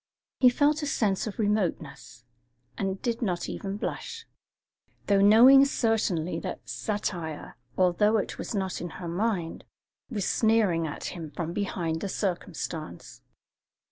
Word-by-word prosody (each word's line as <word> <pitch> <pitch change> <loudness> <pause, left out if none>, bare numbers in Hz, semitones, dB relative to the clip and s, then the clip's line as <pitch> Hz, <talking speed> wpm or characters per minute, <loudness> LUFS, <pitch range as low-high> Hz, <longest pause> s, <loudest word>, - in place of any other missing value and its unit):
He 255 - +7
felt 290 +4 +2
a 295 - -2
sense 210 -7 0
of 210 - -6
remoteness, 185 - -2 0.5
and 195 -1 -2
did 235 0 -1
not 180 -6 -1
even 195 0 -4
blush, 460 - -5 0.8
though 200 -1 +3
knowing 240 +7 +8
certainly 220 - 0
that - - -6
satire, 175 -7 -4 0.2
although 190 +4 +3
it 205 - -3
was - - -4
not 190 -2 -2
in 175 - -4
her 175 - -6
mind, 180 -1 -2 0.5
was 205 -6 -2
sneering 210 -8 +2
at 145 - -5
him 165 -3 -6
from 165 +3 -4
behind 175 -5 -2
the 200 - -3
circumstance. 155 - -4
195 Hz, 135 wpm, -27 LUFS, 170-225 Hz, 0.8 s, knowing